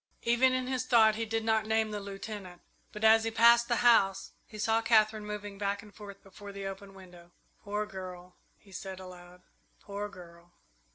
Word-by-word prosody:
Even 240 +2 +3
in 255 0 -1
his 255 0 -3
thought 220 -3 +5
he 225 +1 -3
did 225 0 -2
not 220 -1 +1
name 220 0 +1
the 210 - -4
Lieutenant, 195 -2 -8 0.3
but, 210 - -8
as 220 0 +6
he 225 - -1
passed 235 +1 +5
the 240 - +1
house, 195 -5 +4 0.2
he 215 - -11
saw 225 +2 +1
Katherine 215 -2 +2
moving 205 -1 -7
back 200 +1 -2
and 210 -1 -16
forth 200 -2 -12
before 200 +1 -11
the 200 0 -7
open 195 0 -8
window. 180 -2 -15 0.3
"Poor 210 +1 -2
girl," 185 -3 -9 0.2
he 200 - -21
said 190 0 -7
aloud. 180 -1 -13 0.4
"Poor 205 0 -6
girl!" 175 -2 -15
205 Hz, 185 wpm, -30 LUFS, 195-220 Hz, 0.4 s, as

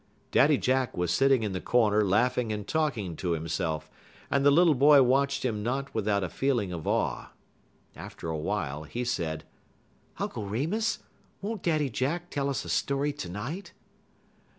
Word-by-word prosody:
Daddy 145 0 +5
Jack 130 -3 0
was 90 -1 0
sitting 135 +1 +3
in 105 - -1
the 95 - -3
corner 110 -3 +3
laughing 115 +4 +1
and 105 -1 -4
talking 120 - -1
to 90 -2 -1
himself, 80 -1 -2 0.4
and 140 - +2
the 145 - +7
little 165 +2 +5
boy 140 +1 +6
watched 135 +2 +1
him 110 -4 -1
not 135 +5 -2
without 100 -2 0
a - - -1
feeling 120 -8 0
of 85 -3 -6
awe. - - 0 0.7
After - - -8
a 80 - -2
while 75 -1 -2
he 120 +10 -4
said: 80 -9 -2 0.7
"Uncle 105 - -4
Remus, 175 - -1 0.4
won't 210 0 -4
Daddy 155 -5 +1
Jack 165 +10 -2
tell 140 -1 -1
us 140 - -2
a - - -7
story 140 +1 0
to 90 - -6
night?" 130 - -6
125 Hz, 165 wpm, -28 LUFS, 100-140 Hz, 0.7 s, the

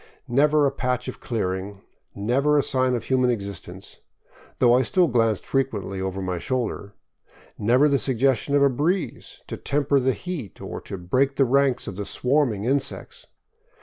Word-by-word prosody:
Never 145 +4 +3
a 140 - +2
patch 125 -2 -2
of 130 - -6
clearing, 95 -3 -3 0.3
never 135 +9 +1
a 145 - +3
sign 130 -1 +1
of 115 - -3
human 130 0 +2
existence 100 -4 -6 0.3
— - - -26
though 120 -1 +4
I 125 - +5
still 175 +8 +2
glanced 115 -5 +1
frequently 105 -8 -2
over 95 0 -3
my 90 -2 -2
shoulder 115 -3 -3 0.3
— - - -30 0.2
never 125 +7 +4
the 140 -2 +2
suggestion 135 +2 +1
of 140 - +4
a 140 - +5
breeze 165 +8 -2
to - - -6
temper 140 0 +1
the 130 0 +1
heat 160 - -7
or - - -7
to 100 - -7
break 130 +10 0
the 135 - +3
ranks 135 0 +2
of 95 - -7
the 105 - -4
swarming 125 -6 0
insects! 135 +2 -2
125 Hz, 175 wpm, -24 LUFS, 105-140 Hz, 0.3 s, I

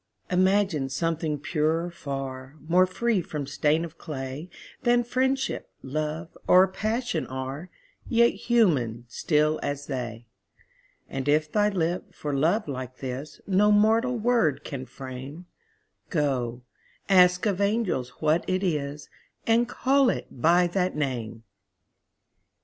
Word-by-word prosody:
Imagine 185 -6 +2
something 160 +1 -1
purer 160 +3 0
far, 135 -3 -6
More 180 +2 +5
free 220 +2 0
from 150 -3 -5
stain 155 +4 +1
of 160 -1 -12
clay 140 +1 -6 0.3
Than 240 -1 +3
Friendship, 265 +2 -1
Love, 155 +4 -4
or 185 +1 +7
Passion 220 +6 -2
are, 130 +6 -5 0.4
Yet 235 0 +5
human, 140 - +1
still 150 +5 +1
as 145 0 -3
they: 120 -4 -5 0.8
And 135 +1 -3
if 155 +1 +2
thy 210 0 +3
lip, 175 -2 -2
for 145 -1 -4
love 170 +9 +2
like 130 -2 -5
this, 135 +3 -6
No 205 +2 +4
mortal 225 +4 +3
word 225 - +2
can 130 -2 -6
frame, 135 +5 -8 0.6
Go, 130 -6 -1 0.4
ask 180 -1 +5
of 200 -2 0
angels 200 - 0
what 155 +2 +2
it 185 +1 0
is, 150 -4 -2 0.4
And 235 +1 +3
call 270 +1 +3
it - - -2
by 170 +7 +3
that 180 +1 0
name! 120 -6 -3
160 Hz, 125 wpm, -26 LUFS, 135-200 Hz, 0.8 s, or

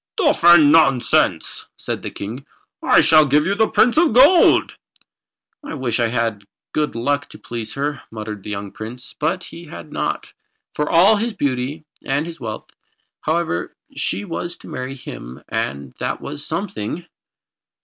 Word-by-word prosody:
"Stuff 300 - +2
and 170 -4 +8
nonsense!" 135 -6 +3
said - - -4
the - - -4
King. 115 +7 -7 0.4
"I - - +5
shall 155 -2 +6
give 150 +2 +3
you 190 - +1
to 215 +2 +3
the - - -3
Prince 240 +4 +3
of 320 -6 +4
Gold." 285 +9 +6 0.9
"I 285 - -6
wish 125 -4 -1
I 120 - +3
had 115 -2 -1
the 100 - -27 0.3
good 150 -4 -1
luck 145 +5 -1
to - - -12
please 115 -2 -6
her," 140 0 -2
muttered 105 -2 -6
the 105 - -8
young 100 -1 -5
Prince. 120 +3 -9
But 170 +5 -1
he 170 +1 -10
had 85 - -10
not, - - -3 0.4
for 150 - -1
all 185 +6 +6
his 230 +2 -1
beauty 140 +3 -2 0.2
and 140 +3 0
his 170 -1 -8
wealth. 110 -4 -6 0.5
However, 160 - -1 0.2
she 100 +2 -2
was 170 +9 -4
to - - -15
marry 130 +1 -5
him, 60 - -9
and 70 -1 -3
that - - -2
was 145 - -7
something. 165 - -4
145 Hz, 170 wpm, -20 LUFS, 115-170 Hz, 0.9 s, and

